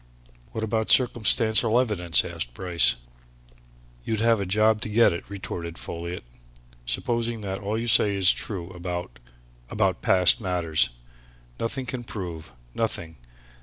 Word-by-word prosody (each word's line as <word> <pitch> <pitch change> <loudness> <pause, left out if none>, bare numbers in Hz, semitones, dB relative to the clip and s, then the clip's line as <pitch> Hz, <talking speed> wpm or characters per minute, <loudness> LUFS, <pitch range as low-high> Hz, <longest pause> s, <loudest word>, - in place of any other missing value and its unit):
"What 110 - -4
about 110 0 -1
circumstantial 115 -1 +4
evidence," 90 -10 +1
asked - - -4
Bryce. 85 -9 +2 1.1
"You'd 110 - -2
have 115 -1 +2
a 100 - -3
job 110 +2 +2
to - - -4
get 115 -2 +4
it," 85 - -5
retorted 85 -4 -6
Folliot. 85 +1 -6 0.6
"Supposing 115 - -1
that 95 -1 -4
all 105 +2 -3
you 115 - -3
say 105 -3 +4
is 95 -1 +5
true 95 -4 -5
about 90 -7 -6 0.5
about 95 -4 0
past 95 +5 +3
matters? 85 -7 0 0.7
Nothing 130 +3 -2
can 125 -1 -5
prove 85 - -7 0.2
nothing! 85 -8 -3
100 Hz, 130 wpm, -25 LUFS, 85-110 Hz, 1.1 s, is